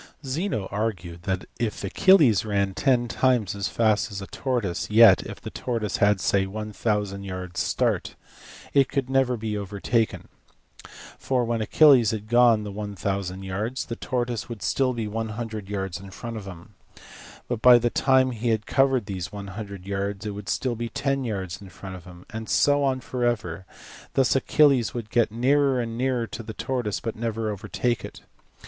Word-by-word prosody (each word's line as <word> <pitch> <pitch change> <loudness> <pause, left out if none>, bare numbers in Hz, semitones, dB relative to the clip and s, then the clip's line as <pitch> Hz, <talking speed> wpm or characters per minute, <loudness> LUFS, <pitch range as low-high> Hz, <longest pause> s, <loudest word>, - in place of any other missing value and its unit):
Zeno 135 - -2
argued 95 -5 -3
that 95 -1 -2
if 115 -3 -2
Achilles 130 - +5
ran 100 -2 0
ten 125 +1 +2
times 120 -4 +1
as 100 0 -2
fast 110 -1 +1
as 100 - -5
a 100 - -6
tortoise, 115 -7 -2
yet 105 -3 +7
if - - -8
the - - -8
tortoise 115 -4 -2
had 100 -1 +3
(say) 95 +1 +1
1000 105 -1 -2
yards 90 -2 -5
start - - 0 0.6
it 135 -2 +4
could 135 -2 -2
never 130 -2 +2
be 110 -1 -3
overtaken: 105 +3 -1 0.9
for, 125 -2 0
when 115 -1 -1
Achilles 130 -1 +6
had 110 -1 -4
gone 120 -2 +5
the 105 - -6
1000 100 -2 -4
yards, 105 +8 -3
the 115 - -5
tortoise 120 -4 -3
would 115 -5 -7
still 130 +4 +1
be 115 -3 -3
100 110 -1 -4
yards 95 -3 -3
in 95 +1 -11
front 115 +4 -7
of 105 -3 -6
him; 95 +3 -11 0.9
by 125 0 +9
the 120 0 0
time 130 -1 +3
he 120 0 -2
had 110 -1 0
covered 135 -4 +2
these 95 -2 -5
100 100 -1 -7
yards, 100 +1 -3
it 105 - -2
would 100 0 -7
still 125 -3 -1
be 115 +1 -4
10 135 +2 -1
yards 95 -6 -4
in 100 - -11
front 95 0 -9
of 90 -2 -12
him; 90 0 -13
and 110 0 -6
so 145 0 +3
on 130 -1 0
for 125 0 -4
ever: 100 -7 -1 0.5
thus 135 -1 +3
Achilles 135 -3 +3
would 115 -3 -5
get 120 -3 +2
nearer 135 +3 +2
and 115 -1 -3
nearer 125 -1 0
to 115 - -7
the 110 -1 -7
tortoise 120 -6 -2
but 115 - -4
never 115 -1 -2
overtake 120 +4 -2
it. - - -9
110 Hz, 175 wpm, -25 LUFS, 100-125 Hz, 0.9 s, by